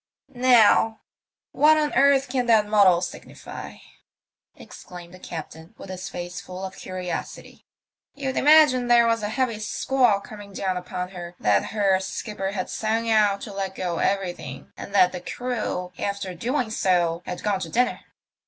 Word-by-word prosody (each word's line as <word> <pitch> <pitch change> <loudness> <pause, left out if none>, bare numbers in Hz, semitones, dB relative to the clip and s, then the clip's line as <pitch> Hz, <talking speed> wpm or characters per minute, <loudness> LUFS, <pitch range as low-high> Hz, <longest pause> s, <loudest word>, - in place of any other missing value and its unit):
"Now, 240 -3 +4 0.5
what 310 +1 +5
on 300 -1 0
earth 275 0 +4
can 250 -1 -1
that 220 -2 +5
muddle 200 -4 +4
signify?" 175 - -8 0.8
exclaimed 175 -1 -12
the 185 - -12
captain, 160 -1 -9
with 190 - -9
his 185 +1 -6
face 175 0 -6
full 185 +1 -7
of 190 - -8
curiosity. 185 -1 -7 0.2
" - - -53
You'd 270 -2 -3
imagine 290 -4 +5
there 240 -1 +5
was 230 -1 +1
a 210 - -2
heavy 240 -2 -1
squall 240 -1 +1
coming 205 -1 -11
down 190 -1 -2
upon 180 0 -5
her, 175 -2 -9
that 100 -2 +2
her 195 -3 +1
skipper 195 +1 -4
had 185 -3 -3
sung 225 +1 -1
out 205 -2 +3
to 210 - -7
let 195 -1 -4
go 175 -2 -3
everything, 195 -2 -3
and 200 - -8
that 185 -2 +5
the 180 - -6
crew, 215 -5 -4
after 200 -2 -3
doing 240 - -2
so, 175 -5 +1
had 180 - -5
gone 205 -2 0
to - - -5
dinner. 245 +1 +1
200 Hz, 160 wpm, -24 LUFS, 180-240 Hz, 0.8 s, what